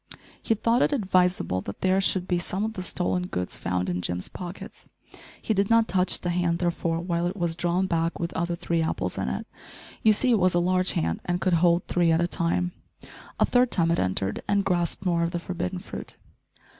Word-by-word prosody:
He 225 - +1
thought 230 +3 +2
it - - +3
advisable 180 - +1
that 100 - -8
there 190 +1 +3
should 185 -1 0
be 175 -1 +1
some 190 +3 -2
of 220 - -3
the 185 - -5
stolen 180 0 -1
goods 90 - -4
found 90 +1 -2
in 90 0 -2
Jim's 90 0 -3
pockets! 180 +1 -9 0.5
He 220 - -1
did 200 -1 +1
not 230 -1 +4
touch 180 0 +3
the 175 - -1
hand, 175 -1 +1
therefore, 170 -1 -1
while 170 0 -1
it 185 +3 -4
was 170 -3 -1
drawn 175 +2 0
back 165 -2 -1
with 170 0 -3
other 170 +1 -1
three 170 -1 -1
apples 90 - -2
in 65 - -1
it. 65 - -4 0.6
You 220 - +5
see 230 +4 +2
it 225 - +4
was 185 -1 +3
a - - +4
large 185 +1 +2
hand, 80 +1 -1
and 175 0 -1
could 185 -1 +1
hold 170 +1 +3
three 175 -2 +2
at 160 - +3
a 170 - +2
time. 175 +1 0 0.7
A - - +5
third 250 0 +3
time 165 -6 +2
it 170 - +1
entered 95 +1 -1
and 200 -1 +1
grasped 175 0 0
more 170 -2 +2
of 170 0 -1
the 175 - -1
forbidden 180 +1 -4
fruit. 180 - -8
175 Hz, 220 wpm, -26 LUFS, 170-185 Hz, 0.7 s, You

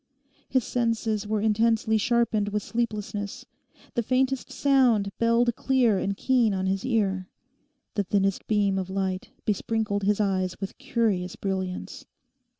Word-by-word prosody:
His 260 -2 +2
senses 225 -3 -1
were 215 -1 0
intensely 220 +1 +2
sharpened 225 -2 +1
with 210 0 -2
sleeplessness. 210 -3 -3 0.5
The 235 - +1
faintest 260 +2 0
sound 250 -8 +3
belled 235 0 +3
clear 245 -7 +2
and 195 +1 -2
keen 240 -6 +2
on 190 0 -1
his 190 +1 0
ear. 195 -7 0 0.6
The 205 - 0
thinnest 195 +1 0
beam 200 -2 +2
of 185 -1 -4
light 190 -1 -2 0.2
besprinkled 215 0 0
his 205 +1 +1
eyes 190 -3 0
with 195 -1 -6
curious 195 -6 0
brilliance. 190 -2 -4
210 Hz, 135 wpm, -26 LUFS, 195-230 Hz, 0.6 s, sound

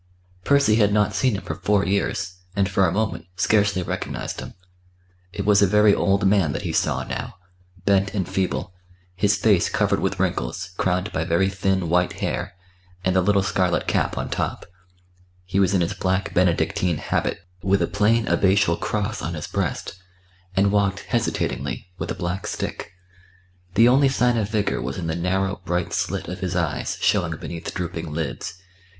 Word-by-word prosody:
Percy 140 -5 +4
had 105 -2 +4
not 105 0 +2
seen 120 +2 +1
him 100 - -5
for - - -4
four 100 +4 +1
years, 100 -1 -1 0.2
and 100 -1 +2
for 95 -1 +2
a - - 0
moment 100 -5 -2
scarcely 100 0 +2
recognised - - -4
him. - - -8 0.8
It 100 +2 -4
was 105 -1 +5
a 100 - +6
very 105 +2 +5
old 100 0 +2
man 95 -7 +3
that - - -4
he - - -3
saw - - +1
now, - - -5 0.5
bent 100 0 +3
and 95 -4 -1
feeble, 95 -1 -2 0.4
his 100 +2 +2
face 100 -3 +3
covered - - +1
with - - -1
wrinkles, - - -2
crowned 90 +2 0
by 80 - -1
very 85 +4 +2
thin, 95 -2 0
white 90 +2 +2
hair, 90 +1 -3 0.5
and 95 0 +2
the 95 - +5
little 100 +1 +3
scarlet 95 -2 +1
cap - - 0
on - - -3
top; - - -2 0.8
he 95 +2 -1
was 95 0 +3
in 90 - +3
his 85 - 0
black 95 +1 -1
Benedictine 90 -1 +1
habit - - -1 0.2
with 95 +1 +2
a - - +3
plain 110 +3 +2
abbatial 95 -2 +3
cross 110 +1 -2
on 85 - -3
his 75 - -5
breast, 95 - -3 0.5
and 100 +1 +3
walked 100 -1 +1
hesitatingly, 115 -5 -2
with - - -4
a - - -2
black 95 +3 -3
stick. - - -5 0.8
The 115 - +6
only 135 +2 +5
sign 125 -2 +2
of 105 -3 0
vigour 105 -2 0
was 65 +2 -4
in 90 - -4
the 80 -1 -1
narrow 95 +2 -1
bright 90 0 -2
slit - - -2
of 90 - -5
his 95 -1 -3
eyes 85 -4 -1
showing - - +2
beneath 85 -1 -6
drooping 85 -3 -4
lids. 80 +3 -4
95 Hz, 180 wpm, -23 LUFS, 90-105 Hz, 0.8 s, a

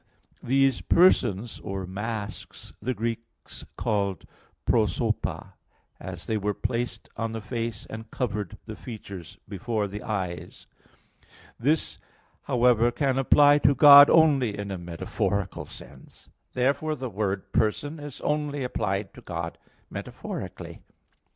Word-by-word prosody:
These 135 0 +2
"persons" 120 - +3
or 95 -1 -5
masks 105 +2 -6
the 130 +3 -2
Greeks 115 +1 -6
called 100 -3 -1 0.4
prosopa, - - 0 0.5
as 90 -2 -7
they 110 - 0
were 105 0 -1
placed 120 0 -3
on 115 0 -2
the 115 - -3
face 115 0 -4
and 110 0 -8
covered 105 -6 -3
the - - -7
features 100 - -9
before 105 +1 -2
the 105 +2 -7
eyes." 95 -5 -4 0.9
This, 150 +7 +1 0.5
however, 120 -1 +4
can 135 +1 0
apply 145 +2 +6
to 140 -1 +4
God 145 +1 +10
only 140 -9 +4
in 100 -1 -5
a 95 - -4
metaphorical 90 +3 -3
sense. - - -14 0.2
Therefore 140 +5 +1
the 130 -2 -5
word 100 -3 -3
"person" 145 +8 0
is 145 -2 -8
only 150 -2 -1
applied 100 -5 -2
to - - -13
God 85 -1 -5 0.3
metaphorically. - - -7
115 Hz, 120 wpm, -26 LUFS, 100-135 Hz, 0.9 s, God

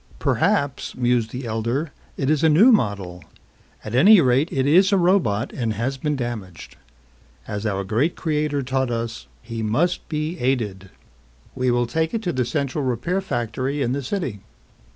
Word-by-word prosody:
"Perhaps," 140 -1 0
mused 120 -2 +1
the 125 +2 -6
elder, 115 +7 -2 0.3
"it 135 - -1
is 155 +1 +2
a 160 - +5
new 195 +12 +6
model. 100 - 0 0.6
At 110 - -6
any 195 - +7
rate 135 +2 +2
it 130 -1 0
is 185 +7 +5
a 200 - +4
robot 170 - +1
and 115 -4 -2
has 120 +6 -2
been 150 +2 -1
damaged. 115 -9 -6 0.7
As 105 +1 -3
our 100 -1 -1
great 115 - 0
creator 150 -3 -1
taught 130 0 -1
us, 115 -1 -4 0.2
he 115 0 -5
must 145 +12 0
be 155 +2 -3
aided. 110 -7 -1 0.6
We 125 0 0
will 120 0 +2
take 160 - -1
it 225 - -2
to 175 - -1
the 125 -1 0
central 140 +2 -2
repair 130 - -1
factory 130 - -2
in 120 - -1
the 140 +2 -1
city." 135 - -3
130 Hz, 170 wpm, -22 LUFS, 115-155 Hz, 0.7 s, any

